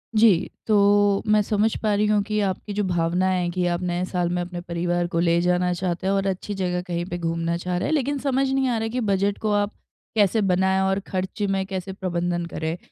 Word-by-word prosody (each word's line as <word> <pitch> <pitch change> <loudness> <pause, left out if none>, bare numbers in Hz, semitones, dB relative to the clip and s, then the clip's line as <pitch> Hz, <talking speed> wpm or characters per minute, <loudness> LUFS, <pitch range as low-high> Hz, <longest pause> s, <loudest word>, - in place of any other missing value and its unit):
जी, 210 -5 +4 0.2
तो 205 -1 +4
मैं 215 0 +5
समझ 210 +1 +1
पा 215 -2 +1
रही 210 +1 +2
हूँ 210 -1 +3
कि 215 0 -2
आपकी 200 +1 -2
जो 210 - 0
भावना 175 0 +1
है 180 -2 0
कि 180 0 -1
आप 175 +1 -1
नए 180 0 -1
साल 180 -2 -1
में 180 0 -1
अपने 175 0 -5
परिवार 175 0 -1
को 170 -2 -2
ले 170 0 +3
जाना 180 0 +2
चाहते 180 +1 -2
हैं 195 - +2
और 195 0 0
अच्छी 195 +2 -3
जगह 180 -2 -1
कहीं 175 0 -2
पे 175 - -3
घूमना 165 0 -1
चाह 180 +1 -2
रहे 180 - -1
हैं - - 0
लेकिन 285 -1 0
समझ 270 0 +1
नहीं 270 -1 +1
आ 240 - 0
रहा 225 0 -1
कि 250 +3 -2
बजट 200 +1 +1
को 215 -1 0
आप 205 +1 +1 0.4
कैसे 210 +1 +3
बनाए 190 0 +2
और 195 +1 +1
खर्च 190 +3 -4
में 195 0 0
कैसे 190 0 -4
प्रबंधन 175 -2 -2
करें। 160 0 -4
190 Hz, 230 wpm, -24 LUFS, 175-205 Hz, 0.4 s, मैं